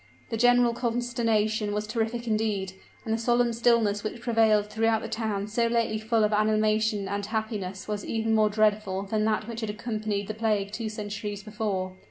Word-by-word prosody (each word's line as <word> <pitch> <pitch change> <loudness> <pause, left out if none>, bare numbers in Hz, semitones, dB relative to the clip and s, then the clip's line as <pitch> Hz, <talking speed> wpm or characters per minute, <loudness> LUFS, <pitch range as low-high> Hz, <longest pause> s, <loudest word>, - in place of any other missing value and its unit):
The - - 0
general 245 +1 +4
consternation 230 -3 0
was 210 0 -1
terrific 230 +2 -2
indeed; 215 -4 0 0.3
and 220 - 0
the 225 - 0
solemn 240 0 +2
stillness 230 -3 +2
which 220 +2 -4
prevailed 225 -3 +3
throughout 220 +1 +1
the - - -4
town 215 -3 -2
so 230 +3 0
lately 230 -2 0
full 220 0 +1
of 210 0 +2
animation 215 -1 +2
and 200 +1 -2
happiness 205 -3 -3
was 210 -1 -3
even 225 0 -1
more 215 -1 +4
dreadful 210 -2 +1
than 215 +2 0
that 215 0 0
which 230 0 -5
had 220 - -3
accompanied 215 -2 -3
the 215 - -3
plague 210 -2 0
two 225 0 -3
centuries 205 -1 -5
before. 205 -3 -3
215 Hz, 180 wpm, -27 LUFS, 210-225 Hz, 0.3 s, general